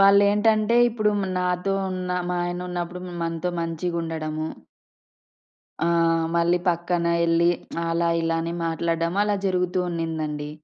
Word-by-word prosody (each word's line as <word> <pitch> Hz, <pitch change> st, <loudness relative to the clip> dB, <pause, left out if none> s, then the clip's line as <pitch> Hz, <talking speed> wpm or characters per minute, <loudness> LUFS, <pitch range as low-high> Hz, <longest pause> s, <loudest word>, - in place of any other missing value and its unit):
వాళ్ళెంటంటే, 210 Hz, +3 st, +5 dB
ఇప్పుడు 215 Hz, -2 st, +1 dB, 0.3 s
నాతో 180 Hz, +2 st, 0 dB, 0.2 s
ఉన్న 185 Hz, -1 st, -4 dB, 0.2 s
మా 180 Hz, -, 0 dB
ఆయన 175 Hz, 0 st, -3 dB
ఉన్నప్పుడు 175 Hz, 0 st, -4 dB, 0.2 s
మనతో 165 Hz, +1 st, -2 dB
మంచిగా 165 Hz, +1 st, -2 dB
ఉండడము. 155 Hz, -1 st, -3 dB, 1.4 s
ఆ! -, -, +3 dB, 0.5 s
మళ్ళీ 170 Hz, +1 st, +3 dB
పక్కన 175 Hz, 0 st, 0 dB, 0.2 s
ఎళ్లి, 170 Hz, +1 st, +4 dB, 0.4 s
అలా, 170 Hz, 0 st, +1 dB
ఇలా 165 Hz, 0 st, 0 dB
అని 170 Hz, +1 st, -3 dB
మాట్లాడడం 165 Hz, +1 st, -1 dB
అలా 210 Hz, -1 st, +1 dB
జరుగుతూ 180 Hz, -1 st, +1 dB
ఉన్నిదండి. 155 Hz, -3 st, -3 dB
170 Hz, 120 wpm, -24 LUFS, 165-180 Hz, 1.4 s, వాళ్ళెంటంటే